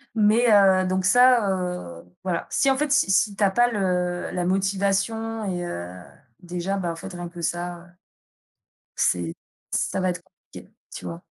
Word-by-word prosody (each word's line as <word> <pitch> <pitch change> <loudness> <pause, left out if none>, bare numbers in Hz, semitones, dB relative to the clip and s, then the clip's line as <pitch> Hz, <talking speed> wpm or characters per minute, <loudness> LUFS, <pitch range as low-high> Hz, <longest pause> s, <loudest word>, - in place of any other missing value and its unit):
Mais, 220 +3 +4
heu, 190 -2 +5
donc 185 0 0
ça, 245 +1 +5
heu 180 - -4 0.2
voilà 180 -3 -2
si 275 - +2
en 265 - +2
fait 300 0 -1
si 285 -7 +3
si 200 +1 +2
tu 205 - -1
as 200 - +5
pas 240 +4 +3
le 180 -4 -1
la 180 -1 -2
motivation 200 +4 0
et 180 -2 -3
heu, 90 - -5 0.5
déjà, 180 +2 -3
bah, 175 -3 -2
en - - -6
fait, 190 +3 -9
rien 175 -1 -6
que 175 0 -10
ça, 175 +1 -3
heu, 170 - -16 1.1
c'est 85 -2 0 0.4
ça - - -1
va 185 0 +1
être 175 -1 -5
compliqué, - - -16 0.2
tu - - -8
vois? 85 -1 -6
185 Hz, 180 wpm, -24 LUFS, 175-205 Hz, 1.1 s, heu